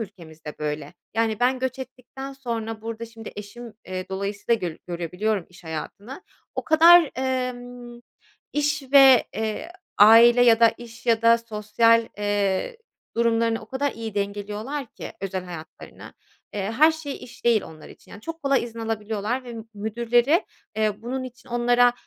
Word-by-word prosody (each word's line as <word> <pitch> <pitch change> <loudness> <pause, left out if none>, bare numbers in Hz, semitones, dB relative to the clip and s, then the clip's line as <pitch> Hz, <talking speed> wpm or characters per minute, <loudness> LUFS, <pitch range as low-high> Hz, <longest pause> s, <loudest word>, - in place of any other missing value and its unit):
ülkemizde 160 -7 -9
böyle. 150 +1 -4 0.2
Yani 225 -1 0
ben 255 +1 +2
göç 260 0 -3
ettikten 260 +1 -8
sonra 225 -4 -5
burada 230 0 -5
şimdi 225 -1 -10
eşim, 215 +3 -9
eee, 185 0 -5
dolayısıyla 200 +4 -1
göl 160 - -8
görebiliyorum 180 +3 -2
iş 180 0 -18
hayatını. 200 - -7 0.3
O - - -3
kadar, 330 0 +7
emm, 245 -2 -4 0.5
iş 295 0 0
ve, 270 -3 +8
eee, 220 +9 -3 0.3
aile 230 +3 +8
ya 230 -2 +5
da 230 - +8
iş 235 0 -12
ya 230 -1 +3
da 230 0 +6
sosyal, 230 +1 +2
eee, 205 - -1 0.4
durumlarını 230 -1 +2
o - - -12
kadar 265 +4 -2
iyi 225 -2 -7
dengeliyorlar 205 +7 -4
ki - - -9
özel 190 -1 -4
hayatlarını. 170 -3 -11 0.4
Eee, 200 +1 -3
her 310 +4 +7
şey 310 -3 -6
iş 245 - -15
değil 230 -4 +4
onlar 155 -1 -12
için. - - -17
Yani, 200 - -11
çok 330 +6 -7
kolay 275 -1 +2
izin 230 -1 -9
alabiliyorlar 225 +2 -3
ve 240 - -8
m 225 - -7
müdürleri, 235 - +1 0.3
eee, 215 -1 0
bunun 255 +3 -3
için 255 +1 -12
onlara, 245 0 +3
230 Hz, 155 wpm, -24 LUFS, 205-250 Hz, 0.5 s, ve